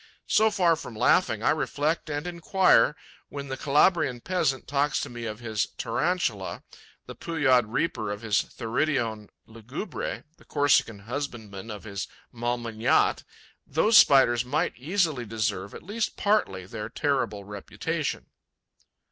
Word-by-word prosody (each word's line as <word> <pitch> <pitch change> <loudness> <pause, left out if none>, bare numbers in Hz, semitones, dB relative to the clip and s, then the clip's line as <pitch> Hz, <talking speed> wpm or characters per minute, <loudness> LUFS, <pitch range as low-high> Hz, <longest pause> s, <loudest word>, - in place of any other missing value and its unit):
So 220 +1 +4
far 180 -5 +3
from 125 -7 -9
laughing, - - +2
I - - +4
reflect 155 +3 -1
and 145 +1 -3
enquire, 175 -5 +3 0.3
when 140 -1 -7
the 135 - -2
Calabrian 145 -1 +2
peasant 135 -4 -1
talks 145 +1 +1
to - - -5
me 120 -1 -6
of 110 0 -6
his 110 -3 -1
Tarantula, 115 - -1 0.4
the - - -8
Pujaud 135 -8 +2
reaper 115 -5 -1
of 105 +2 -5
his 105 -2 +2
Theridion 115 -3 -2 0.2
lugubre, 115 - -6
the - - -21
Corsican 140 -7 +2
husbandman 115 -4 -6
of 105 -2 -7
his 100 -3 -5 0.3
Malmignatte. 120 -2 +1 0.4
Those 210 +10 +2
Spiders 130 - +6
might 125 +4 0
easily 155 -1 0
deserve, 105 -3 -3
at - - -10
least 215 +4 -3
partly, 150 - +1
their 105 +2 -6
terrible 125 -7 -1
reputation. 100 0 -4
125 Hz, 130 wpm, -26 LUFS, 110-155 Hz, 0.4 s, Spiders